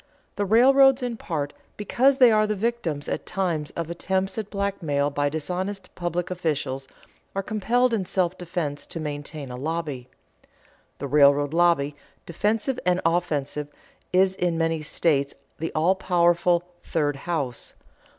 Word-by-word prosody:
The 205 Hz, -, 0 dB
railroads, 265 Hz, +5 st, +6 dB
in 245 Hz, -2 st, -2 dB
part 150 Hz, -9 st, -3 dB, 0.2 s
because 260 Hz, +6 st, +2 dB
they 250 Hz, -4 st, +7 dB
are 215 Hz, 0 st, +3 dB
the 210 Hz, -, 0 dB
victims 200 Hz, -9 st, -2 dB
at -, -, -3 dB
times 170 Hz, -6 st, -1 dB
of 170 Hz, -2 st, -3 dB
attempts 190 Hz, +3 st, -1 dB
at 210 Hz, -2 st, -5 dB
blackmail 170 Hz, -9 st, -1 dB
by 145 Hz, 0 st, 0 dB
dishonest 185 Hz, +5 st, -4 dB
public 175 Hz, 0 st, -3 dB
officials, 145 Hz, -6 st, -2 dB, 0.5 s
are 195 Hz, -, -1 dB
compelled 235 Hz, +4 st, +1 dB
in 200 Hz, -4 st, 0 dB
self 180 Hz, -1 st, 0 dB
defense 170 Hz, -5 st, -4 dB
to 165 Hz, -, -6 dB
maintain 145 Hz, -2 st, -5 dB
a -, -, -5 dB
lobby. 145 Hz, -3 st, -4 dB, 0.9 s
The 140 Hz, -, -4 dB
railroad 145 Hz, 0 st, +4 dB
lobby, 165 Hz, -4 st, +3 dB, 0.3 s
defensive 215 Hz, -, 0 dB
and 180 Hz, 0 st, +2 dB
offensive, 150 Hz, -4 st, 0 dB, 0.4 s
is 185 Hz, +1 st, +4 dB
in 175 Hz, -3 st, -1 dB
many 165 Hz, -1 st, 0 dB
states 145 Hz, -2 st, 0 dB, 0.2 s
the 165 Hz, -, -3 dB
all 165 Hz, +4 st, +4 dB
powerful 175 Hz, -1 st, +2 dB, 0.2 s
"third 145 Hz, -3 st, -1 dB
house." 140 Hz, -6 st, -4 dB
170 Hz, 140 wpm, -25 LUFS, 150-195 Hz, 0.9 s, they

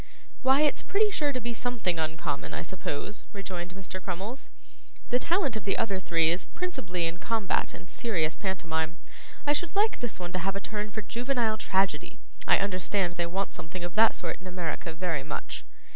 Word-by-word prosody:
'Why, 265 Hz, +2 st, +6 dB
it's 300 Hz, -1 st, +4 dB
pretty 420 Hz, +1 st, +3 dB
sure 295 Hz, -7 st, +2 dB
to 255 Hz, -, -1 dB
be 240 Hz, 0 st, -2 dB
something 225 Hz, -8 st, 0 dB
uncommon, 160 Hz, -2 st, -1 dB
I -, -, -2 dB
suppose,' 190 Hz, +3 st, -3 dB
rejoined 185 Hz, -2 st, -4 dB
Mr. 185 Hz, -1 st, -5 dB
Crummles. 195 Hz, +8 st, -3 dB, 0.6 s
'The 245 Hz, -, +5 dB
talent 330 Hz, -, +2 dB
of 215 Hz, -, -3 dB
the 195 Hz, -, +1 dB
other 200 Hz, -4 st, +1 dB
three 165 Hz, -3 st, +4 dB
is 175 Hz, +2 st, 0 dB
principally 210 Hz, -, -2 dB
in 165 Hz, +2 st, -1 dB
combat 220 Hz, -1 st, +1 dB
and 180 Hz, -, -10 dB
serious 170 Hz, -10 st, +1 dB
pantomime. 165 Hz, -4 st, -1 dB, 0.5 s
I 290 Hz, -, +5 dB
should 340 Hz, +4 st, -1 dB
like 425 Hz, +2 st, +4 dB
this 240 Hz, -5 st, -3 dB
one 175 Hz, -1 st, -4 dB
to 185 Hz, -, +1 dB
have 195 Hz, +2 st, 0 dB
a -, -, 0 dB
turn 210 Hz, +1 st, -3 dB
for 210 Hz, +1 st, -4 dB
juvenile 235 Hz, 0 st, +1 dB
tragedy; 190 Hz, -1 st, +1 dB, 0.3 s
I -, -, +7 dB
understand 190 Hz, -1 st, +1 dB
they 175 Hz, -1 st, 0 dB
want 190 Hz, +3 st, -1 dB
something 170 Hz, +2 st, -6 dB
of 175 Hz, -1 st, -3 dB
that 220 Hz, +2 st, +6 dB
sort -, -, -2 dB
in 185 Hz, -, -8 dB
America 175 Hz, -2 st, -2 dB
very 165 Hz, -3 st, -1 dB
much. 150 Hz, -, -4 dB
195 Hz, 190 wpm, -30 LUFS, 175-235 Hz, 0.6 s, I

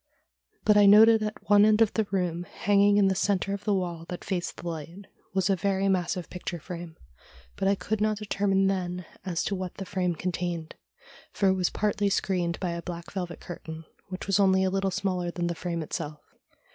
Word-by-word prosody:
But 210 Hz, -1 st, +5 dB
I 205 Hz, -1 st, +7 dB
noted 220 Hz, +2 st, +8 dB
at 215 Hz, 0 st, -5 dB
one 205 Hz, 0 st, +6 dB
end 215 Hz, 0 st, +5 dB
of 225 Hz, -2 st, +4 dB
the 220 Hz, -2 st, 0 dB
room, 180 Hz, -3 st, -1 dB
hanging 205 Hz, +2 st, +3 dB
in 200 Hz, -1 st, +5 dB
the 190 Hz, -, +3 dB
centre 195 Hz, 0 st, 0 dB
of 200 Hz, 0 st, -6 dB
the 210 Hz, -, +2 dB
wall 170 Hz, -3 st, -3 dB
that 180 Hz, -, -6 dB
faced 180 Hz, -3 st, -3 dB
the 175 Hz, -, -7 dB
light, 170 Hz, +4 st, -6 dB, 0.3 s
was 190 Hz, -1 st, +2 dB
a 195 Hz, -, +3 dB
very 195 Hz, +1 st, 0 dB
massive 180 Hz, -1 st, 0 dB
picture 180 Hz, -1 st, -6 dB
frame, 170 Hz, 0 st, -8 dB, 0.6 s
but 195 Hz, -, -1 dB
I 200 Hz, -, +4 dB
could 215 Hz, +2 st, -3 dB
not 215 Hz, 0 st, +1 dB
determine 200 Hz, -2 st, +1 dB
then 180 Hz, -2 st, -1 dB, 0.2 s
as 175 Hz, -3 st, -2 dB
to -, -, -2 dB
what 185 Hz, -2 st, -4 dB
the 195 Hz, -, -6 dB
frame 180 Hz, -2 st, -1 dB
contained, 175 Hz, -1 st, -3 dB, 0.6 s
for 195 Hz, -, +2 dB
it -, -, +4 dB
was 185 Hz, -2 st, +1 dB
partly 205 Hz, -1 st, 0 dB
screened 180 Hz, -3 st, 0 dB
by 180 Hz, -2 st, -2 dB
a 170 Hz, 0 st, -4 dB
black 170 Hz, -1 st, -7 dB
velvet 180 Hz, -3 st, -5 dB
curtain, 160 Hz, -2 st, -8 dB, 0.2 s
which 185 Hz, 0 st, -6 dB
was 195 Hz, 0 st, +2 dB
only 190 Hz, -1 st, +4 dB
a 190 Hz, -, +1 dB
little 195 Hz, 0 st, 0 dB
smaller 185 Hz, -2 st, -1 dB
than 175 Hz, 0 st, -3 dB
the 170 Hz, -, -1 dB
frame 170 Hz, -1 st, -3 dB
itself. 150 Hz, 0 st, -5 dB
190 Hz, 210 wpm, -27 LUFS, 175-200 Hz, 0.6 s, noted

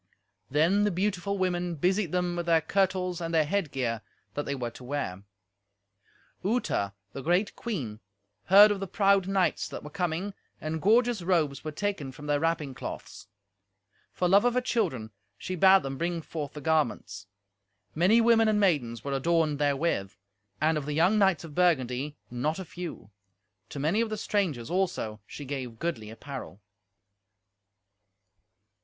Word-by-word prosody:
Then 165 Hz, +9 st, +3 dB
the 210 Hz, -, +3 dB
beautiful 200 Hz, +1 st, -1 dB
women 180 Hz, -2 st, -1 dB
busied 180 Hz, +3 st, +1 dB
them 180 Hz, -1 st, 0 dB
with 175 Hz, 0 st, -3 dB
their 165 Hz, -1 st, +4 dB
kirtles 185 Hz, -1 st, 0 dB
and 165 Hz, 0 st, -3 dB
their 160 Hz, -2 st, +3 dB
headgear 135 Hz, -, -1 dB, 0.3 s
that 145 Hz, -, -3 dB
they 140 Hz, -, -1 dB
were 120 Hz, -3 st, -4 dB
to 125 Hz, -, -13 dB
wear. 125 Hz, -9 st, -3 dB, 1.2 s
Uta, 200 Hz, -, 0 dB, 0.2 s
the 135 Hz, -, -5 dB
great 175 Hz, +8 st, +1 dB
queen, 135 Hz, -, -4 dB, 0.5 s
heard 205 Hz, +3 st, +8 dB
of 205 Hz, -, -1 dB
the 195 Hz, -, -4 dB
proud 195 Hz, -1 st, +3 dB
knights 195 Hz, -2 st, +1 dB
that -, -, -7 dB
were 150 Hz, -, -9 dB
coming, 180 Hz, +1 st, -2 dB, 0.3 s
and 155 Hz, 0 st, -3 dB
gorgeous 230 Hz, +1 st, +3 dB
robes 165 Hz, -6 st, +1 dB
were 155 Hz, -, -4 dB
taken 155 Hz, -5 st, -3 dB
from 145 Hz, +3 st, -11 dB
their 145 Hz, -1 st, +1 dB
wrapping 160 Hz, -3 st, -1 dB
cloths. 115 Hz, -, -8 dB, 0.8 s
For 180 Hz, -, 0 dB
love 195 Hz, +3 st, +5 dB
of 245 Hz, 0 st, +2 dB
her 250 Hz, -, +3 dB
children 165 Hz, -, -1 dB, 0.3 s
she 185 Hz, -, -5 dB
bade 190 Hz, +2 st, +6 dB
them 135 Hz, -1 st, -5 dB
bring 170 Hz, -1 st, -2 dB
forth 150 Hz, -3 st, -5 dB
the 150 Hz, -, -8 dB
garments. 140 Hz, -10 st, -1 dB, 0.7 s
Many 190 Hz, +8 st, +4 dB
women 225 Hz, -1 st, +5 dB
and 215 Hz, -1 st, +3 dB
maidens 130 Hz, -, +1 dB
were 140 Hz, -, -3 dB
adorned 155 Hz, +1 st, +1 dB
therewith, 145 Hz, -, 0 dB, 0.4 s
and, 155 Hz, +1 st, +2 dB
of 145 Hz, -, -8 dB
the 150 Hz, -, -2 dB
young 180 Hz, +7 st, +4 dB
knights 190 Hz, -6 st, +3 dB
of 160 Hz, -3 st, -9 dB
Burgundy, 145 Hz, -4 st, +1 dB
not 145 Hz, +6 st, -1 dB
a 190 Hz, -, -6 dB
few. 170 Hz, -, -8 dB, 0.6 s
To -, -, -8 dB
many 160 Hz, +10 st, +1 dB
of 230 Hz, -, -1 dB
the 215 Hz, -, -3 dB
strangers, 170 Hz, -, -1 dB
also, 175 Hz, -, -1 dB
she 145 Hz, -, -8 dB
gave 130 Hz, -4 st, -5 dB
goodly 110 Hz, -8 st, -3 dB
apparel. 115 Hz, -3 st, -8 dB
165 Hz, 160 wpm, -28 LUFS, 140-195 Hz, 1.2 s, heard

